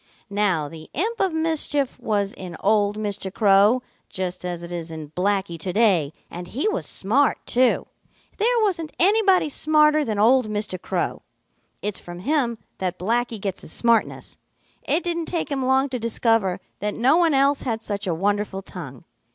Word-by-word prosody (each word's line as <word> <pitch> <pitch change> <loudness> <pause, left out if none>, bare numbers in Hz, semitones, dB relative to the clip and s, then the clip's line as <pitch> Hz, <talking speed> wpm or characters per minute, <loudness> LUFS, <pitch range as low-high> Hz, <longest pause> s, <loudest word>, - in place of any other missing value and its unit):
"Now 195 -7 +1
the 160 +1 -11
imp 440 - -1
of 385 -2 +2
mischief 315 -4 -1
was 205 -2 -1
in 180 -3 -8
old 205 0 +2
Mr. 205 -3 -3
Crow, 205 +4 +4 0.3
just 185 -1 -4
as 175 -1 -4
it 170 - -8
is 170 -1 -5
in 155 -2 -8
Blacky 190 -1 -1
to 180 +3 -3
day, 185 -9 +3 0.2
and 175 +1 -8
he 270 - -1
was 430 - -1
smart 260 +9 +2
too. 250 0 +2 0.5
There 470 +3 +2
wasn't 340 -7 -1
anybody 390 -2 +4
smarter 305 +1 +3
than 220 -6 -2
old 235 +2 +4
Mr. 210 -3 -3
Crow. - - -2 0.6
It's 205 0 -2
from 175 0 -9
him 245 - 0 0.2
that 180 -1 -2
Blacky 230 +4 -1
gets 195 -1 -4
his - - -9
smartness. 235 -2 0 0.5
It 350 - +1
didn't 340 -2 -2
take 335 -4 -3
him 270 -2 -1
long 265 +1 +3
to 250 -1 -3
discover 225 -4 +1 0.2
that 210 0 -2
no 260 +7 +4
one 335 -4 +3
else 275 +1 +3
had 225 -3 -3
such 205 -2 -4
a 170 - 0
wonderful 200 +1 -1
tongue. 135 -11 -9
215 Hz, 170 wpm, -23 LUFS, 190-285 Hz, 0.6 s, Crow